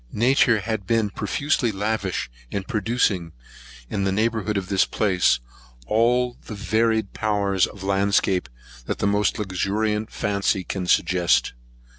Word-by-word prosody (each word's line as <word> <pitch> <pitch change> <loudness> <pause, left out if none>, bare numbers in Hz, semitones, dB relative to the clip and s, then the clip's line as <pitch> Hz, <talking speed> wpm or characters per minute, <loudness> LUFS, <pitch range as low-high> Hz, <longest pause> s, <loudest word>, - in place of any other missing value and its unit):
Nature 120 -1 +3
has 110 +2 -2
been 105 +1 0
profusely 125 +3 0
lavish, 100 -1 -2 0.2
in 100 - -3
producing, 100 -5 0 0.5
in 100 +7 -2
the 95 - +1
neighbourhood 110 0 0
of 95 -2 -3
this 95 -1 +3
place, 95 - +2 0.5
all 120 - +2
the 110 - -7
varied 110 0 0
powers 100 -3 +1
of 100 -2 -11
landscape 95 -5 +1 0.4
that - - -2
the - - -1
most 100 +1 +1
luxuriant 105 +2 -1
fancy 100 -1 0
can 90 0 -4
suggest. 90 -6 +2
105 Hz, 130 wpm, -23 LUFS, 95-110 Hz, 0.5 s, Nature